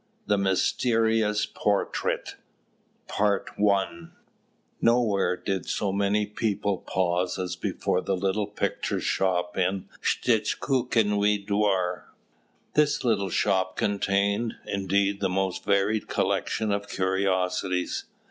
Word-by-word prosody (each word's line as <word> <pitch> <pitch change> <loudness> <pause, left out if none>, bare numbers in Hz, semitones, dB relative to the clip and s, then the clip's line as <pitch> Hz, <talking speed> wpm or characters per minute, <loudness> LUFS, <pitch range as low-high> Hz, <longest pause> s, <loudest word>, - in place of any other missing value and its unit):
THE 105 - +2
MYSTERIOUS 110 +2 +2
PORTRAIT 100 -1 -1 0.7
PART 105 -1 0
I 95 -5 +1 0.7
Nowhere 115 -6 +2
did 95 -2 -3
so 100 - -1
many 100 +1 +1
people 105 -2 -1
pause 90 -1 -1
as 90 -1 -3
before - - -1
the 95 - -1
little 100 +2 0
picture 105 - -2
shop 90 -2 0
in 95 +1 0
the - - -22
Shtchukinui 105 -5 +1
Dvor. 100 -3 0 0.7
This 150 -2 +2
little 105 -5 +1
shop 95 +1 +1
contained, 100 +2 0
indeed, 100 +1 0
the 95 - 0
most 95 0 -1
varied 100 +2 +1
collection 110 -2 0
of 100 0 -2
curiosities. 95 -1 0
100 Hz, 105 wpm, -26 LUFS, 95-105 Hz, 0.7 s, THE